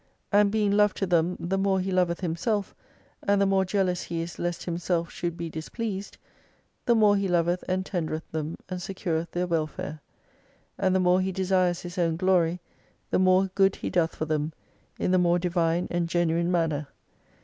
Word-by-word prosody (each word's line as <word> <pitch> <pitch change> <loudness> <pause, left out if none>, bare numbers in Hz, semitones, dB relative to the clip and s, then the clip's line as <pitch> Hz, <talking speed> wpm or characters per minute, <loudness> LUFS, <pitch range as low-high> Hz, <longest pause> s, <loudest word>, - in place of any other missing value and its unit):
And 205 0 +5
being 210 -1 +1
Love 210 0 +3
to 195 - -1
them 175 0 +1
the 190 +3 -1
more 195 -1 +2
He 190 +1 -2
loveth 180 -1 +1
Himself, 190 +5 -1 0.5
and 200 0 +2
the 200 - +4
more 195 0 +3
jealous 185 -2 0
He 170 -1 -3
is 170 0 -8
lest 175 0 -2
Himself 170 -1 -1
should 170 -1 -4
be 170 -1 -4
displeased, 195 +6 -5 0.7
the 235 - +5
more 210 -2 +5
He 200 -1 0
loveth 175 0 +1
and 185 0 -1
tendereth 160 -4 -3
them 155 0 -3
and 185 -1 -4
secureth 170 -3 -3
their 175 +2 -1
welfare. 155 -2 -3 0.8
And 190 -1 +1
the - - +4
more 180 0 +4
He 190 +1 -1
desires 185 -2 +1
His 175 +1 -6
own 165 -2 +1
glory, 180 -2 +2 0.5
the - - +3
more 185 0 +4
good 195 0 +3
He - - -4
doth 170 -2 +1
for 155 - -2
them, 155 0 -1 0.4
in - - 0
the 185 - +4
more 175 0 +3
divine 170 -1 0
and 175 -1 0
genuine 170 0 +1
manner. 160 -4 0
180 Hz, 185 wpm, -27 LUFS, 170-190 Hz, 0.8 s, And